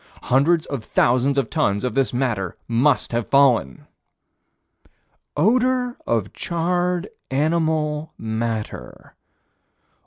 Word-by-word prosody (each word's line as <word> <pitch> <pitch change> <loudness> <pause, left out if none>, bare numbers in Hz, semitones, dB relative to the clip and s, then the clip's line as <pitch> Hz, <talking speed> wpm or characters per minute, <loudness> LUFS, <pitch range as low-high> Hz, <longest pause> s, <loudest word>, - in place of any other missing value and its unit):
Hundreds 155 +6 +2
of 140 -6 -5
thousands 130 +5 +2
of 135 -4 +1
tons 100 -11 0
of 125 - -1
this 135 -5 +1
matter 120 -8 -2
must 125 +5 +2
have 120 -1 -1
fallen. 125 - +3 1.5
"Odor 250 - +2
of 110 -4 -1
charred 175 +1 -1 0.2
animal 155 +1 0
matter." 110 - -5
140 Hz, 95 wpm, -22 LUFS, 115-165 Hz, 1.5 s, fallen